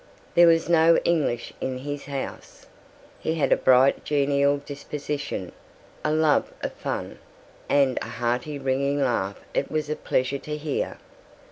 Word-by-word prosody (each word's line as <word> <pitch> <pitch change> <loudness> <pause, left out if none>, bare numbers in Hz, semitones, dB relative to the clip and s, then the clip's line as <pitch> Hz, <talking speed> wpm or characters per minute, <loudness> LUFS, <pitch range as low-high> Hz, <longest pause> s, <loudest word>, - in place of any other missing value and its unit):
There 175 0 +7
was 165 -1 +4
no 165 -1 +5
English 145 -8 0
in 130 -1 -2
his 145 +2 -5
house. 140 -1 -7 0.5
He 160 - -1
had 155 - +1
a - - +7
bright 130 +1 +4
genial 140 -1 +2
disposition, 145 -7 -5 0.5
a 150 - +1
love 155 -1 +2
of - - -2
fun, - - -5 0.5
and 135 -3 +3
a - - -4
hearty 120 +5 -2
ringing 140 +1 0
laugh 115 -7 0
it 140 - 0
was 155 -1 -2
a - - 0
pleasure 130 0 -1
to 150 +1 -5
hear. 150 -1 -3
140 Hz, 145 wpm, -25 LUFS, 130-150 Hz, 0.5 s, There